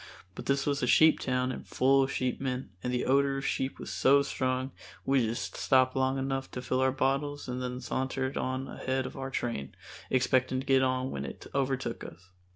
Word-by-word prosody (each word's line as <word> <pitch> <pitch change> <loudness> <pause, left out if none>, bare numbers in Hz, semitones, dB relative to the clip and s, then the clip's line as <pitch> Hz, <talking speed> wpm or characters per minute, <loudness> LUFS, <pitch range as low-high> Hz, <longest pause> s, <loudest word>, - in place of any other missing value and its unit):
But - - -8
this 140 0 +1
was 145 0 0
a - - +1
sheep 160 0 +6
town 125 0 0
and - - -6
full 135 +1 +3
of 135 - 0
sheepmen 130 -3 -2
and 125 - -2
the 125 0 0
odor 135 +1 +3
of 135 - -4
sheep 130 +1 -1
was - - -7
so 140 +1 +4
strong 130 -1 -1 0.3
we 135 0 +3
just 115 +2 -3
stopped 130 -1 +3
long 130 0 +1
enough 135 0 -2
to 125 - -4
fill 130 +1 0
our 130 0 +3
bottles 140 +2 -1
and 125 0 -3
then 125 0 -3
sauntered 130 +2 -2
on 130 +1 -2
ahead 130 0 -2
of - - -7
our 135 0 -4
train, 115 - -3 0.3
expecting 130 0 +2
to 135 - -6
get 135 0 +4
on 130 0 0
when 70 - -4
it 70 - -8
overtook 135 -1 -1
us. 90 +2 -12
130 Hz, 205 wpm, -30 LUFS, 130-135 Hz, 0.3 s, sheep